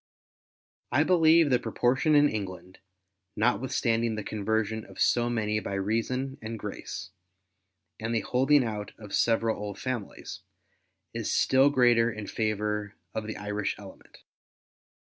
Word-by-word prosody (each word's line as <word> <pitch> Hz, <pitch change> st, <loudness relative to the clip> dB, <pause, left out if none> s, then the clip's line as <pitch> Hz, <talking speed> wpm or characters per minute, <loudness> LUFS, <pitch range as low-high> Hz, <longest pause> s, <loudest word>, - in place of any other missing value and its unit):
161 -, -, +2 dB
I -, -, +6 dB
believe 165 Hz, -3 st, +5 dB
the 125 Hz, -, +4 dB
proportion 135 Hz, +5 st, +1 dB
in 145 Hz, 0 st, +6 dB
England, 95 Hz, -5 st, -6 dB, 0.6 s
notwithstanding 115 Hz, 0 st, +1 dB
the 110 Hz, -, -4 dB
con 105 Hz, 0 st, -5 dB
version 110 Hz, +1 st, 0 dB
of 95 Hz, -2 st, -14 dB
so 120 Hz, 0 st, +3 dB
many 110 Hz, -2 st, 0 dB
by 100 Hz, -, -5 dB
reason 125 Hz, +7 st, -2 dB
and 115 Hz, +1 st, -5 dB
grace, 100 Hz, -2 st, -7 dB, 0.9 s
and 110 Hz, +1 st, -3 dB
the 110 Hz, -, +1 dB
holding 135 Hz, +5 st, +3 dB
out 105 Hz, -3 st, -4 dB
of 105 Hz, -3 st, -11 dB
several 115 Hz, -1 st, +1 dB
old 105 Hz, -1 st, -5 dB
families, 125 Hz, -6 st, -5 dB, 0.7 s
is -, -, -3 dB
still 135 Hz, +2 st, +4 dB
greater 120 Hz, -4 st, +4 dB
in 110 Hz, -1 st, -7 dB
favour 105 Hz, -1 st, -2 dB, 0.2 s
of 110 Hz, -1 st, -4 dB
the 110 Hz, -, -5 dB
Irish 105 Hz, -1 st, -2 dB
element. -, -, -14 dB
110 Hz, 140 wpm, -28 LUFS, 105-125 Hz, 0.9 s, I